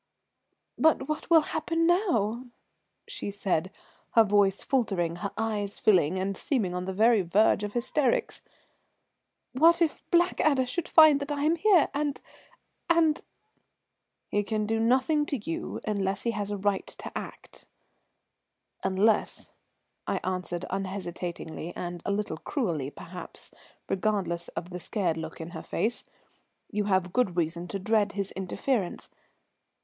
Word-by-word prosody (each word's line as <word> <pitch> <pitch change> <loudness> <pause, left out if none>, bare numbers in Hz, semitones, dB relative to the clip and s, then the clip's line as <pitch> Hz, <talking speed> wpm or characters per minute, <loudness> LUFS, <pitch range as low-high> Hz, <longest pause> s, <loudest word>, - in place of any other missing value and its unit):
"But 315 -4 +3
what 305 +2 -4
will 330 -2 +7
happen 330 +2 -1
now?" 255 - +1 0.6
she 475 - -5
said, 190 -3 -1 0.4
her 225 - +7
voice 200 -2 +2
faltering, 190 -10 0
her 200 +2 -4
eyes 210 -2 -2
filling, 185 -4 +3
and 195 +1 -1
seemingly 195 -7 -1
on 180 0 -3
the 190 - -3
very 220 +2 +4
verge 200 +4 +3
of 205 0 -4
hysterics. 295 - 0 1.1
"What 330 +6 +5
if 330 -3 0
Blackadder 310 -6 +3
should 310 +7 -3
find 310 -3 +7
that 285 +1 -4
I 290 -1 -1
am 315 +3 +3
here, 365 -2 +4
and 290 -1 -1 0.7
and 330 -3 +3 0.5
" - - -54
"He 205 - +2
can 215 0 -2
do 225 +1 0
nothing 260 +6 +3
to 280 - -1
you 330 +9 -5
unless 200 -2 -1
he 235 - +1
has 205 -2 -3
a 205 - -2
right 200 0 0
to - - -8
act, - - -9 1.2
unless," 195 +3 +1 0.6
I - - 0
answered 180 -1 -3
unhesitatingly 180 -3 -5
and 175 -1 -5
a - - +1
little 200 -5 -2
cruelly 165 - -2
perhaps, 180 +4 -10 0.4
regardless 185 -4 -1
of 175 +1 -6
the 180 - -5
scared 175 -2 -1
look 160 0 -6
in 165 +1 -7
her - - -6
face, 235 +3 -1 0.7
"you 210 -2 -1
have 185 -3 +1
good 200 -9 +1
reason 170 +1 -1
to 195 - -4
dread 205 +1 +1
his 195 -1 -3
interference. 190 +2 -2
205 Hz, 145 wpm, -28 LUFS, 185-270 Hz, 1.2 s, will